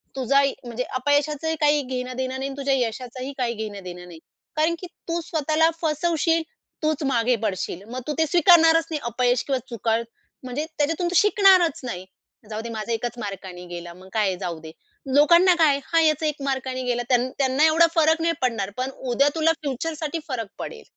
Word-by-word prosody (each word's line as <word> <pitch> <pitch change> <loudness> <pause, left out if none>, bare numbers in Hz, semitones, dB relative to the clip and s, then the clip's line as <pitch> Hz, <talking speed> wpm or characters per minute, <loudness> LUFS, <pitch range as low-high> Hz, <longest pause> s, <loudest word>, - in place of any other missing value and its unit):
तुझा 275 +1 +3
इ, 275 - +2
म्हणजे 240 +1 -3 0.2
अपयशाचं 290 +3 +1
ही 320 - 0
काही 295 0 +4
घेणं-देणं 255 0 -4
नाही 270 - -2
आणि 275 - -8
तुझ्या 275 -1 0
यशाचंही 255 +2 -4
काही 240 -2 -1
घेणं-देणं 195 -5 -7
नाही. 170 -2 -12 0.4
कारण 315 +2 +2
की 360 - -7 0.2
तू 335 0 -1
स्वतःला 315 0 +1
फसवशील, 330 +1 +1 0.4
तूच 310 -1 0
मागे 250 -3 +2
पडशील. 190 -3 -3
मग 255 - -4
तू 300 - -1
ते 320 - +4
स्वीकारणारच 330 -1 +5
नाही 305 - -1
अपयश 245 +1 +1
किंवा 270 -2 0
चुका. 225 -1 0 0.5
म्हणजे 260 +4 -3
त्याच्यातून 325 +4 0
तू 350 - -3
शिकणारच 385 -6 +5
नाही. 185 -7 -5 0.4
जाऊ 215 +1 -4
दे, 235 - -7
माझा 220 0 -5
1च 240 +1 -3
मार्काने 190 -4 -7
गेला 175 0 -8
मग 185 +2 -15
काय 215 -2 +2
आहे, 190 - 0
जाऊ 175 -4 -4
दे. 160 0 -10 0.4
लोकांना 340 +5 +6
काय 320 - +6
आहे, 280 0 +1
हा 330 - +5
याचा 310 -1 +2
1 300 -2 -2
मार्काने 260 -1 -2
गेला 245 -1 -1
त्यानं 250 0 +2
त्यांना 270 +2 +3
एवढा 330 +2 +5
फरक 320 0 +3
नाही 335 0 +2
पडणार. 225 -6 0
पण 255 +1 -1 0.2
उद्या 280 +4 +4
तुला 325 0 +3
फ्युचरसाठी 310 +3 -3
फरक 235 -7 -3
पडेल. 460 -1 -7
270 Hz, 190 wpm, -24 LUFS, 235-315 Hz, 0.5 s, लोकांना